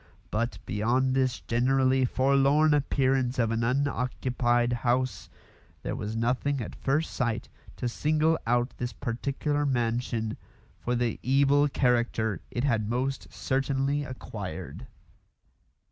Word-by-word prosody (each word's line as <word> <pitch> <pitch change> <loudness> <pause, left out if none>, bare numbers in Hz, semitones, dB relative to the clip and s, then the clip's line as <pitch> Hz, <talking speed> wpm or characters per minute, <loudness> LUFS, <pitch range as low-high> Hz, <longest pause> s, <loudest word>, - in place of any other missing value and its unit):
But, 115 +3 -1
beyond 125 +5 +1
this 130 -2 +1
generally 130 +2 +2
forlorn 140 +4 +3
appearance 135 -3 +1
of 115 -2 +2
an 115 0 0
unoccupied 125 -2 +1
house, 125 +1 0 0.5
there - - -2
was 105 +2 -4
nothing 130 +5 0
at 115 - -5
first 150 +4 -1
sight 120 -2 -1 0.3
to 125 - -3
single 155 +5 +1
out 120 +2 +1
this 125 0 -3
particular 140 +5 -2
mansion 120 -4 -1 0.4
for 125 - -1
the 120 -1 -1
evil 140 +2 +4
character 120 - +1
it 120 - -3
had 115 -6 +1
most 130 +3 -2
certainly 135 +2 0
acquired. 95 - -7
125 Hz, 115 wpm, -28 LUFS, 120-135 Hz, 0.5 s, evil